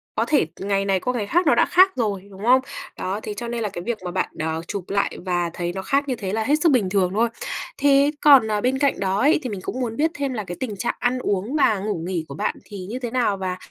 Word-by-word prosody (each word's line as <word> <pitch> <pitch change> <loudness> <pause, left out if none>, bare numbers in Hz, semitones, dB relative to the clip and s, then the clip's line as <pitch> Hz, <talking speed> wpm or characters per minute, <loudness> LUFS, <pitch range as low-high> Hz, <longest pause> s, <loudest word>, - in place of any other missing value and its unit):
có 225 - +1
thể 290 - +3
ngày 195 0 0
này 195 -1 +2
qua 250 +6 -2
ngày 215 -5 -2
khác 350 - +2
nó - - +5
đã - - +4
khác 375 +2 +5
rồi, 200 -5 -2
đúng 195 +1 -10
không? 255 +2 +6 0.4
Đó, 195 +3 -3
thế 210 - -4
cho 235 +3 -6
nên 235 -1 -3
là 210 - -1
cái 180 -3 -6
việc 235 +1 -2
mà 180 - -3
bạn, 185 - -1
ờ, 160 +1 -2
chụp 200 -3 -4
lại 200 0 0
và 175 -2 0
thấy 175 0 -3
nó 190 - -4
khác 275 +8 0
như 260 - -1
thế 195 -4 -4
là 220 0 0
hết 290 +6 +3
sức 330 -3 +4
bình 220 -8 +2
thường 185 -2 +1
thôi. 230 +3 +2 0.5
Thế 280 0 +4
còn, 275 -6 +7
ờ, 210 -1 0
bên 260 +3 +1
cạnh 280 -1 +1
đó 195 0 0
ấy, 290 +6 +4
thì 255 - -3
mình 200 - -5
cũng 255 - -4
muốn 230 -3 -2
biết 315 +2 +2
thêm 280 -3 -2
là 215 -3 -3
cái 175 -2 -7
tình 235 -6 -3
trạng 235 - -2
ăn 245 +1 0
uống 205 +4 -1
và 220 -8 +3
ngủ 200 -3 -3
nghỉ 175 -4 -2
của 140 - -8
bạn - - -1
thì 195 -3 -8
như 250 +4 -4
thế 240 -2 -4
nào 240 -5 +1
và 185 -1 -3
215 Hz, 290 wpm, -23 LUFS, 190-255 Hz, 0.5 s, còn